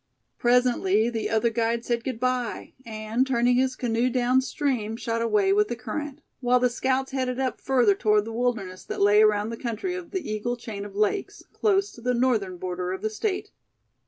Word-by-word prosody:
Presently 240 -3 +3
the 225 -2 -2
other 225 +1 +2
guide 230 0 0
said 235 -1 -1
good 255 -3 -4
bye, 255 -1 -2
and 220 +3 -1
turning 245 -1 +2
his 260 0 +1
canoe 240 0 0
down 255 +1 +2
stream, 250 -6 -2
shot 230 -1 -2
away 210 -4 +2
with 210 +1 +3
the 240 - -3
current; 295 +5 -5 0.2
while 250 0 +3
the 250 0 +2
scouts 265 +2 0
headed 255 -1 -2
up 260 -1 -2
further 245 -6 +3
toward 210 0 +2
the 225 - -6
wilderness 225 -6 -2
that - - -5
lay 205 +1 +5
around 210 0 +3
the 230 - -5
country 235 - -3
of 360 -2 -6
the 375 -3 -4
Eagle 240 +3 -2
chain 215 -4 -7
of 200 -1 -10
lakes, 215 - -1
close 400 -2 +1
to 235 - -14
the 250 +1 0
northern 225 -7 +1
border 180 0 -3
of 190 - -5
the 215 - -1
State. 380 - -3
235 Hz, 195 wpm, -25 LUFS, 215-255 Hz, 0.2 s, lay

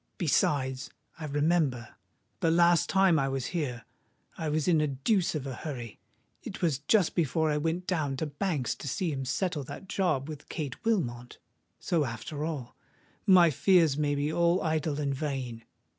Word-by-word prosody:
Besides—I 140 -2 -1
remember—the 140 - -1
last 170 +1 +4
time 190 -4 +4
I 135 0 0
was 135 -1 -2
here, 130 -9 -3 0.5
I 160 - -3
was 155 +1 0
in 165 -4 +4
a 150 - +2
deuce 165 - 0
of 145 -3 -3
a 135 - -4
hurry: 120 -5 -7 0.4
it - - -8
was 155 -6 +2
just 180 +5 +2
before 160 -1 +1
I 150 - +1
went 165 +4 -1
down 150 -8 -1
to 160 - -1
Banks's 145 - -2
to - - -7
see 170 +5 -1
him 135 -2 -3
settle 155 +3 -1
that 195 - -9
job 165 -9 0
with 150 -2 -9
Kate 145 -6 -5
Wilmot. 125 - -1 0.4
So, 165 -3 +1
after 135 +4 -5
all—my 165 - +1
fears 165 -2 +4
may 145 -1 0
be 145 +2 -1
all 170 +2 +3
idle 155 -2 -1
and 140 -2 0
vain! 130 -5 -4
150 Hz, 160 wpm, -29 LUFS, 135-170 Hz, 0.5 s, last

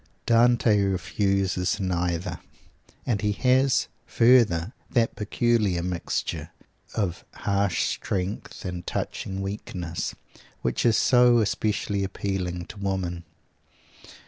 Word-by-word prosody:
Dante 115 -2 +4
refuses 95 0 0
neither; 90 -2 -1 0.7
and 110 -5 0
he 105 -1 +1
has, 130 +3 +3 0.2
further, 115 -6 +4 0.2
that 115 -2 +1
peculiar 105 -4 +1
mixture 90 -1 -3 0.5
of 95 -6 -2
harsh 100 -2 0
strength 95 +2 -3
and 90 -1 -5
touching 95 0 -3
weakness, 90 -5 -4 0.5
which 65 - +1
is 115 - +4
so 125 -1 +5
especially 105 -2 0
appealing 95 -3 -3
to 105 - -11
women. 95 -3 -2
100 Hz, 95 wpm, -26 LUFS, 90-110 Hz, 0.7 s, so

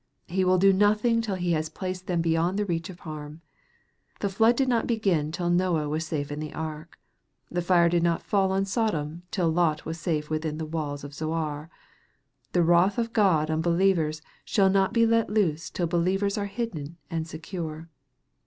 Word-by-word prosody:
He 185 +2 0
will 185 0 +4
do 195 +1 +5
nothing 210 +4 +3
till 210 -4 -2
He 180 -1 -1
has 155 -1 0
placed 185 +2 -5
them 175 -3 +1
beyond 165 +3 +1
the 210 - 0
reach 170 -2 -2
of 185 0 -11
harm. 155 -1 -8 0.8
The 200 - -1
flood 225 +5 +4
did 265 +1 +1
not 235 -3 +1
begin 190 -10 +1
till 175 +1 -1
Noah 175 -4 +1
was 155 +2 -2
safe 145 -2 -3
in 145 - -4
the 155 -1 -6
ark. 155 +1 -6 0.5
The 175 - -1
fire 175 -1 +4
did 170 0 +2
not 170 -1 +1
fall 195 -2 +1
on 195 +1 +1
Sodom 175 -7 -1
till 175 -4 0
Lot 160 -2 +1
was 165 +1 -5
safe 155 -2 -1
within 155 0 -2
the 160 - -3
walls 150 -3 -4
of 145 0 -8
Zoar. 155 0 -3 0.8
The 175 - +4
wrath 175 +4 +4
of 230 -1 -1
God 165 -8 +3
on 155 0 0
believers 170 -2 +1 0.2
shall 195 -2 +3
not 195 0 +2
be 230 0 +4
let 230 0 +2
loose 180 -7 0
till 175 - -2
believers 185 +4 +1
are 205 -2 -2
hidden 175 -8 -5
and 165 -1 -2
secure. 160 -1 -6
170 Hz, 190 wpm, -26 LUFS, 155-195 Hz, 0.8 s, do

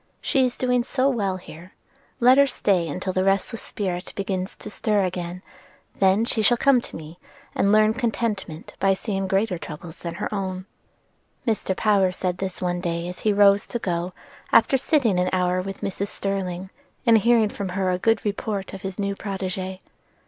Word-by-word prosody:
She 270 - +2
is 250 -1 0
doing 250 -1 +1
so 265 +2 +1
well 200 -7 0
here, 175 0 -13 0.4
let 255 +2 +6
her 280 - +6
stay 180 - +1
till 185 0 -2
the 185 - +1
restless 195 +4 0
spirit 185 -3 -4
begins 190 -1 -3
to - - -11
stir 210 -1 +1
again; 180 0 -4 0.6
then 195 +3 +4
she 225 - 0
shall 240 +3 +4
come 270 0 +4
to - - -9
me 160 +2 -9 0.3
and 200 - +2
learn 215 0 +5
contentment 220 -8 -3
by 195 0 +3
seeing 195 -1 -3
greater 195 -1 0
troubles 160 +1 -9
than 170 -1 -6
her 210 - -4
own." 185 -2 -3 0.8
Mr. 210 -4 0
Power 200 -4 +3
said 180 0 -3
this 190 -1 -4
one 175 0 -1
day 170 -1 -2
as 180 - -7
he 215 - +2
rose 200 0 +5
to - - -3
go, 175 -4 -2 0.4
after - - +5
sitting 260 - +2
an 180 0 +1
hour 180 0 +1
with 195 +1 -7
Mrs. 195 +1 -2
Sterling, 190 -2 -3 0.3
and 230 -2 +6
hearing 230 -1 +4
from 200 -2 -5
her 185 0 0
a 180 - -1
good 225 +4 +2
report 205 -1 -3
of 195 - -7
his 190 0 -5
new 200 -1 -1
protegee. 190 -1 -4
195 Hz, 185 wpm, -24 LUFS, 185-215 Hz, 0.8 s, let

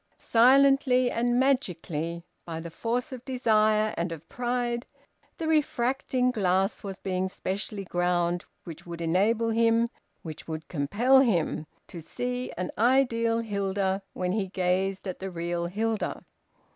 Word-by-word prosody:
Silently 255 +1 +4
and 240 +1 +1
magically, 170 - -1 0.2
by 165 -1 -5
the 165 0 -7
force 240 - -2
of 255 -2 -7
desire 215 -4 +2
and 170 +1 -2
of 165 -1 -8
pride, 240 0 -2 0.5
the 325 - -3
refracting 260 -4 +1
glass 195 -3 +1
was 195 -2 -6
being 185 0 -2
specially 195 +2 -4
ground 175 -1 0 0.2
which 165 -3 -9
would 170 -1 -8
enable 205 +8 +2
him, 230 +1 +3 0.4
which 155 -2 -8
would 160 0 -5
compel 205 - +3
him, 175 - +1 0.2
to 170 - -9
see 250 +9 -4
an 180 0 -3
ideal 230 -2 +3
Hilda 195 -2 -1
when 180 0 -2
he 200 -1 -1
gazed 190 +1 -1
at 185 - -5
the 190 - -4
real 170 0 -2
Hilda. 220 +4 -2
205 Hz, 135 wpm, -27 LUFS, 175-245 Hz, 0.5 s, Silently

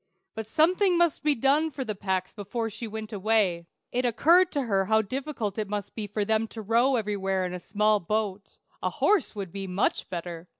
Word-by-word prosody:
But 220 -1 -6
something 360 - +3
must 340 -3 +2
be 300 -1 +2
done 280 +6 +2
for 265 -3 -5
the 215 - -2
Pecks 190 -2 -2
before 225 +2 -4
she 225 +2 -6
went 220 0 -7
away. 195 -5 +1 0.2
It 250 +1 0
occurred 335 +10 +4
to 285 - 0
her 195 -5 +1
how 220 +2 +3
difficult 230 -3 -4
it 210 -2 -3
must 205 -2 -4
be 215 -2 -5
for 205 0 -2
them 220 +1 +1
to 220 - -8
row 235 +5 +3
everywhere 195 -4 -1
in 180 - -4
a 180 - -4
small 210 +3 +2
boat. 205 +1 -3 0.2
A - - 0
horse 400 - +1
would 195 -4 -5
be 195 0 -5
much 185 +2 0
better. 170 -1 -6
215 Hz, 205 wpm, -27 LUFS, 195-250 Hz, 0.2 s, occurred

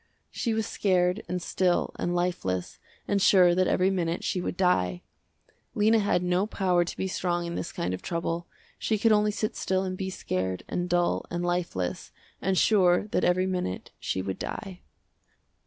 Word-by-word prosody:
She 230 -3 -1
was 220 0 0
scared 180 0 +1
and 180 - -1
still 180 +1 0
and 175 - -1
lifeless, 135 - -2 0.3
and 200 -1 +1
sure 180 -3 +6
that 185 +1 +2
every 185 +1 +2
minute 170 -2 -1
she 180 - -1
would 180 - -4
die. 90 - +1 0.7
Lena 220 +2 +4
had 200 -3 +1
no 180 +3 +1
power 180 -5 +2
to 170 - -6
be 190 - -1
strong 175 -2 -1
in 170 - -4
this 170 - -4
kind 90 +2 -2
of 90 - -5
trouble, 170 0 -3 0.3
she 220 - 0
could 225 +2 +3
only 210 0 +4
sit 210 +1 -2
still 190 0 0
and 185 -1 -3
be 190 0 -3
scared, 95 - -3
and 175 0 -2
dull, 175 0 +1
and 175 +1 -2
lifeless, 170 - -2 0.3
and 190 0 +1
sure 190 -1 +4
that 185 - 0
every 185 +1 +3
minute 180 - -3
she 95 - -2
would 95 -1 -4
die. 190 -4 -6
180 Hz, 180 wpm, -27 LUFS, 175-190 Hz, 0.7 s, sure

